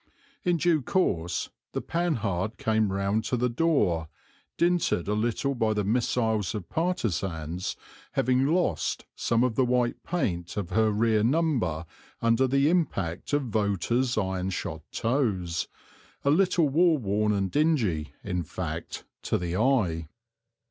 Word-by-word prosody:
In 175 -2 +2
due 165 -1 +2
course 90 - 0 0.2
the - - -1
Panhard 115 - -1
came 110 -2 +1
round 100 +3 0
to 125 - 0
the 125 +1 +1
door, 115 - +1 0.5
dinted 170 - +2
a 105 - +1
little 120 +6 0
by 110 -4 +1
the 105 - +1
missiles 110 -1 0
of 95 -6 -5
partisans, 95 - -2 0.4
having 130 +2 +2
lost 160 - 0
some 115 +1 +1
of 125 -2 +1
the 130 - +2
white 125 -1 +1
paint 90 - -2
of 95 -3 -3
her 110 +2 +3
rear 110 0 +2
number 120 - +1 0.3
under 115 +3 +3
the 140 +2 +3
impact 100 - 0
of 145 -1 +2
voters' 110 +3 0
iron 95 -2 -1
shod 95 - -4
toes, 105 - 0 0.6
a 140 - +4
little 175 -1 +3
war 165 +3 +4
worn 105 -2 0
and 100 -2 0
dingy, 120 - +1
in 90 -3 -2
fact, 80 - -5 0.2
to - - 0
the 85 0 -3
eye. 95 - +1
110 Hz, 140 wpm, -27 LUFS, 95-140 Hz, 0.6 s, a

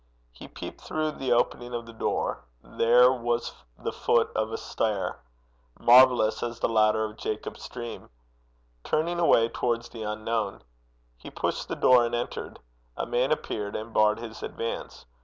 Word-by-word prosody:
He - - -12
peeped - - -9
through 155 0 -2
the 135 -4 -3
opening 120 0 +1
of 120 -1 -4
the 115 - -11
door: 110 - -2 0.2
there 125 +2 +5
was 120 -2 -1 0.2
the - - -4
foot 115 -1 +1
of 110 0 -1
a - - -2
stair 105 -4 -2 0.6
marvellous 125 -2 +6
as 120 -1 -4
the - - +1
ladder 110 -1 +3
of 110 0 -8
Jacob's 110 0 -5
dream 120 -2 -7 0.7
turning 170 +3 0
away 115 -9 +5
towards 120 -1 -2
the 115 - -9
unknown. 110 - -3 0.6
He - - -9
pushed - - -3
the - - -3
door 125 -1 +5
and 120 0 -1
entered. 120 - -4 0.4
A - - -2
man 125 +2 0
appeared 105 -9 -2
and 110 +1 -6
barred 105 0 +4
his 115 -1 -8
advance. 115 - -5
115 Hz, 160 wpm, -27 LUFS, 110-125 Hz, 0.7 s, marvellous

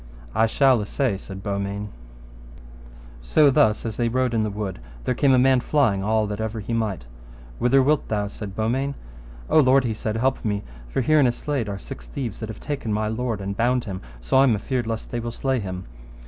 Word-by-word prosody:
I 110 - +3
shall 130 0 +4
assay, 115 +2 0
said 95 0 -9
Beaumains. 100 0 -3 1.3
So 140 - +4
thus 110 -4 +3
as 110 -2 -4
they 120 -1 +1
rode 130 0 0
in 115 - +2
the 110 - 0
wood, 100 - -4 0.2
there - - 0
came 135 +2 +3
a - - +4
man 130 0 +5
flying 115 -8 +2
all 110 +1 +2
that 105 +1 -4
ever 110 0 -3
he 110 +3 -4
might. 105 - -1 0.5
Whither 130 +2 +4
wilt 150 +2 +2
thou? 105 -2 -1
said 100 -1 -7
Beaumains. 130 +6 0 0.5
O - - +5
lord, 135 -1 +5
he 115 -3 -1
said, 110 0 -3
help 130 +3 0
me, 105 -3 -1 0.3
for - - 0
here 155 +5 +3
by - - +6
in 135 - +5
a - - +3
slade 130 -3 -3
are 100 - -3
six - - -9
thieves 115 - -5
that 110 - -5
have 110 - -7
taken 140 -7 -4
my 105 0 0
lord 115 -2 -2
and 100 +1 -3
bound 120 +3 +2
him, 95 -3 -6 0.2
so - - +1
I 135 - +7
am 120 -5 +4
afeard 120 +3 -2
lest 115 -1 -4
they 120 - -2
will 120 0 -3
slay 130 +2 -1
him. 95 -3 -5
110 Hz, 220 wpm, -24 LUFS, 105-130 Hz, 1.3 s, I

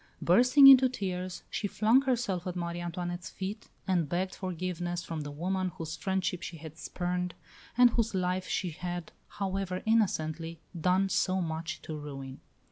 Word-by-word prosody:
Bursting 250 +10 +6
into 265 -1 +10
tears, 185 -5 -4
she 205 - -1
flung 220 +6 +4
herself 230 -9 -1
at 180 - -3
Marie 170 -1 -3
Antoinette's 175 0 -4
feet, 195 +2 -6 0.2
and 175 -6 +1
begged 185 +3 -1
forgiveness 175 -1 -3
from 160 -2 -4
the 145 - -5
woman 185 +5 -1
whose 160 0 -5
friendship 190 +1 -1
she 175 -3 -6
had 160 0 -10
spurned, 180 0 -3 0.4
and 245 -1 +7
whose 230 -3 0
life 185 0 0
she 180 -3 -1
had, 175 +1 -5 0.3
however 190 -2 -2
innocently, 165 -7 0 0.2
done 185 +3 +2
so 190 0 +1
much 165 0 -4
to 155 - -5
ruin. 135 -3 -7
180 Hz, 155 wpm, -30 LUFS, 170-195 Hz, 0.4 s, into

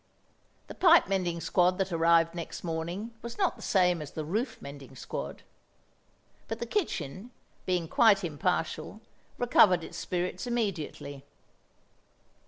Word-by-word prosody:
The - - -9
pipe 340 -2 +6
mending 180 -3 -1
squad 180 +1 +2
that 195 -1 -1
arrived 165 0 +4
next 170 -1 -6
morning 175 +7 -4
was 235 0 -7
not 380 -4 +1
the - - -14
same 180 -4 +2
as 150 - -6
the 155 0 -5
roof 220 - -2
mending 140 -1 -10
squad; - - -6 1.0
but 225 - -3
the 235 - -4
kitchen, 230 - -3 0.4
being 180 -3 0
quite 205 +1 +4
impartial, 165 +2 -2 0.4
recovered 195 -8 +5
its - - -7
spirits 180 +3 -3
immediately. 170 - -3
180 Hz, 130 wpm, -29 LUFS, 165-215 Hz, 1.0 s, pipe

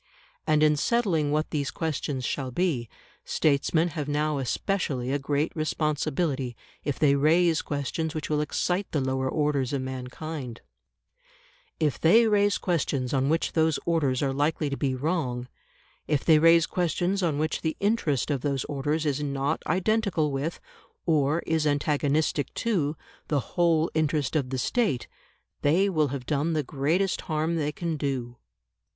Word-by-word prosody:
And 155 0 +4
in 150 -1 +4
settling 180 -7 +1
what 155 +1 0
these 145 -3 -1
questions 145 -5 -3
shall 135 0 -2
be, 130 -5 -1 0.3
statesmen 160 +3 +1
have 150 -3 -4
now 150 0 0
especially 135 -2 -1
a 140 - 0
great 145 +4 -1
responsibility 150 -4 -1 0.3
if 145 - -2
they 145 -2 +4
raise 160 +3 +3
questions 155 +3 -3
which 155 - -3
will 150 -1 +1
excite 180 +5 -1
the 150 - +2
lower 130 0 -1
orders 145 -3 0
of 135 -2 -1
mankind; 130 0 -6 1.2
if 150 -4 0
they 220 +9 +6
raise 205 -1 +3
questions 140 -7 -1
on 135 0 +2
which 165 +2 0
those 160 -2 +2
orders 145 -6 +1
are 135 -1 0
likely 145 +1 0
to - - -1
be 135 -2 -1
wrong; 130 -4 -2 0.6
if 150 -3 0
they 160 -2 +6
raise 165 +1 +6
questions 180 +2 0
on 160 -5 0
which 155 +1 -1
the 160 -1 -2
interest 195 - +1
of 140 -3 -1
those 140 -2 -1
orders 150 +2 -2
is 145 -1 0
not 140 +1 -1
identical 185 -3 +1
with, 140 +5 -3 0.5
or 155 0 +2
is 160 -1 +1
antagonistic 145 0 +1
to, 165 -10 0 0.3
the 145 - +1
whole 170 -2 +2
interest 155 -2 0
of 140 -5 0
the 130 - -2
State, 145 - 0 0.5
they 170 +7 +3
will 155 -6 +2
have 135 -2 -5
done 150 +4 0
the 155 -1 0
greatest 160 +8 0
harm 160 +2 0
they 150 -2 0
can 165 0 -3
do. 130 -4 -3
150 Hz, 155 wpm, -27 LUFS, 140-165 Hz, 1.2 s, they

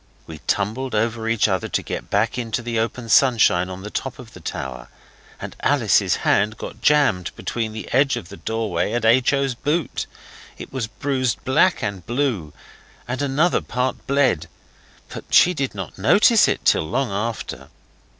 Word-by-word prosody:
We 80 -1 -10
tumbled 110 +6 -1
over 115 +1 -1
each 115 -2 +2
other 95 -3 -1
to - - -2
get - - -6
back 105 +3 +1
into 120 -1 -3
the 115 -1 -2
open 115 +1 -3
sunshine 110 -7 +4
on 95 +1 -8
the 105 - -7
top 135 - -4
of 120 -4 -12
the - - -11
tower, 65 -2 -6 0.5
and - - -7
Alice's - - +2
hand 105 +2 +2
got 110 - -8
jammed 115 -10 +3
between 115 -2 -3
the 110 0 -7
edge 135 +1 +3
of 95 -7 -8
the 100 - -10
doorway 110 -6 -2
and 120 -1 -1
H. 120 +3 +4
O.'s 135 -2 0
boot; 145 +5 -2 0.5
it - - -10
was 130 -4 -2
bruised 130 +2 -2
black 130 +3 +3
and 100 -4 -3
blue, 120 - -1 0.6
and 125 +3 -3
another 145 +5 +2
part 125 +1 -3
bled, 130 - +2 0.6
but - - -8
she 180 - +6
did 135 -8 -3
not 95 -1 -7
notice 210 - +5
it - - -2
till 80 - +3
long 135 +1 -1
after. 100 - -4
115 Hz, 170 wpm, -22 LUFS, 100-130 Hz, 0.6 s, she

